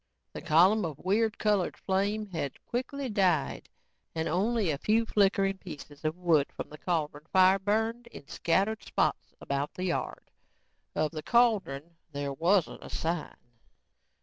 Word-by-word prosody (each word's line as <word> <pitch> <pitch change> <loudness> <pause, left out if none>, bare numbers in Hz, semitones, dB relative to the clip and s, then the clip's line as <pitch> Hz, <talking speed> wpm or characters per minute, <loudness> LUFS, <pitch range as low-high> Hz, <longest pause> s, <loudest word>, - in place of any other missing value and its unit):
The - - -6
column 180 +6 +4
of 155 -5 -4
weird 215 +5 +1
colored 205 -4 +1
flame 200 +3 0
had 165 -8 -5
quickly 265 +3 -3
died 185 - +1 0.5
and 160 0 -1
only 200 +1 +1
a 140 - -3
few 225 +5 +2
flickering 195 -2 +2
pieces 150 -5 -10
of 155 +2 -1
wood 165 -5 +3
from - - -6
the 150 - -10
cauldron 155 -3 -2
fire 190 +1 +5
burned 225 +4 -1
in 145 -11 -12
scattered 200 +8 0
spots - - -1
about 140 +1 -3
the 185 - -4
yard. 175 - -3 0.6
Of 155 -1 0
the 155 -2 -5
cauldron, 180 - +1 0.2
there 140 -1 -3
wasn't 170 +5 +1
a - - -9
sign. 165 -1 -3
185 Hz, 150 wpm, -29 LUFS, 155-210 Hz, 0.6 s, fire